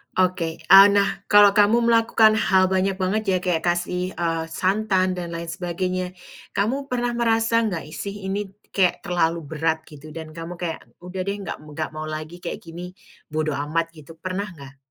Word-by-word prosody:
Oke, 175 -3 0
eee, 195 +4 +9
nah 200 -1 +2
kalau 205 -1 +7
kamu 210 +4 +4
melakukan 230 -1 +4
hal 190 -1 +3
banyak 190 0 +1
banget 195 +3 -1
ya 185 - +3
kayak 175 -3 0
kasih, 180 +1 -1
eee, 165 -1 -1
santan 190 +2 +1
dan 170 -1 -5
lain 170 0 -5
sebagainya, 180 +1 -3 0.4
kamu 260 +8 0
pernah 245 -2 -1
merasa 230 -1 +2
nggak 180 -9 -3
sih 200 +3 -6
ini 200 +1 -2 0.2
kayak 185 -3 +1
terlalu 170 -1 0
berat 160 +2 -1
gitu 150 +1 -13
dan 160 -1 -7
kamu 165 +2 -7
kayak 170 -2 -4 0.2
udah 185 +1 -5
deh 200 - 0
nggak - - -5
m 150 - -16
nggak 155 0 -3
mau 155 0 -6
lagi 155 +3 -6
kayak - - -6
gini, 175 +2 -8 0.3
bodo 155 0 -1
amat 155 +4 -1
gitu 160 0 -14
pernah 185 +4 -4
nggak? 140 -3 -13
180 Hz, 175 wpm, -23 LUFS, 165-200 Hz, 0.4 s, eee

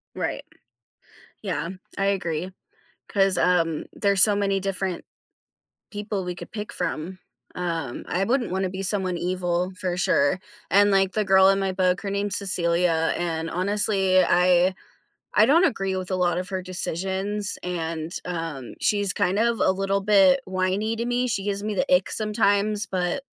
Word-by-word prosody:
Right. - - -3 1.0
Yeah, 165 +3 -3 0.3
I 195 - +1
agree, 180 -3 -1 0.6
'cause, 195 -1 +2
um, 165 -3 +1
there's 200 -2 +3
so 205 0 +6
many 195 -1 0
different 190 -2 -2 0.9
people 205 -2 -4
we 180 -1 -4
could - - -10
pick 210 -1 -6
from. 180 +5 -3 0.4
Um, 165 -8 -3
I 190 - 0
wouldn't 245 -1 0
wanna 190 0 -1
be 190 +1 -5
someone 185 -2 0
evil 180 0 -1
for 180 -1 -2
sure, 180 -2 +2 0.3
and, 205 +1 +5
like, 195 -1 +2
the 215 - +1
girl 190 -1 +5
in 195 - +3
my 195 -1 0
book, 185 0 +1
her 200 - -4
name 200 +1 -1
is 195 - -3
Cecilia, 170 -3 +1
and 165 -1 -2
honestly, 190 0 +2
I 180 +1 +3 0.6
I 215 - +6
don't 330 +8 +5
agree 195 - 0
with 185 0 -5
a 185 - 0
lot 175 -1 +1
of 185 +2 -4
her 190 - -2
decisions, 190 +3 -3
and, 165 -2 -4
um, 165 -8 -5
she's 205 -3 +1
kind 200 0 +1
of 235 0 +1
a - - +4
little 195 +1 -1
bit 210 +7 +5
whiny 190 +4 -1
to 235 +1 -3
me. 245 +1 0
She 220 -5 -1
gives 200 -1 -2
me 215 - -2
the 190 - -1
ick 180 - +2
sometimes, 210 -1 +1
but, 185 +8 -2
190 Hz, 165 wpm, -24 LUFS, 180-205 Hz, 1.0 s, so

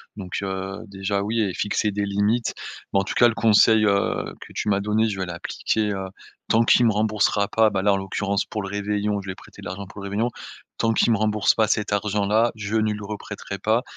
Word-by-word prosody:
donc 95 -3 -5
heu, 95 0 -4
déjà, 100 0 -2
oui 110 +2 0
et 100 -4 0
fixer 105 +2 0
des 100 0 -1
limites. 105 +4 0 0.4
Mais 95 - +4
en - - -2
tout 95 - -4
cas 120 - +6
le 120 - +1
conseil, 110 0 +5
heu, 100 -1 0
que - - -12
tu - - -2
m'as 100 -1 +2
donné 105 +2 +1
je 100 -2 -4
vais 95 - -1
l'appliquer, 90 +5 -2
heu, 95 -1 -3 0.4
tant 115 +1 +4
qu'il 120 +1 +5
me 115 - +4
remboursera 105 -1 +1
pas, 110 -1 +4
bah, 95 -2 -1
là, 100 +1 +3
en - - +1
l'occurrence, 100 +1 -1
pour 105 - -4
le 95 - -5
réveillon, 105 0 -1
je - - -13
lui - - -2
ai - - -18
prêté - - -15
de - - -10
l'argent 95 +3 -6
pour 100 - -11
le 100 - -5
réveillon. 110 +5 0 0.5
Tant 115 0 +1
qu'il 115 - +3
me - - +2
rembourse 105 0 +2
pas 110 -1 +2
cet 105 0 0
argent 100 0 0
là, 110 +3 +3
je 105 0 -4
ne 110 -1 +2
lui 105 - -4
reprêterai 100 -1 -6
pas 110 +5 +1
105 Hz, 245 wpm, -23 LUFS, 100-110 Hz, 0.5 s, cas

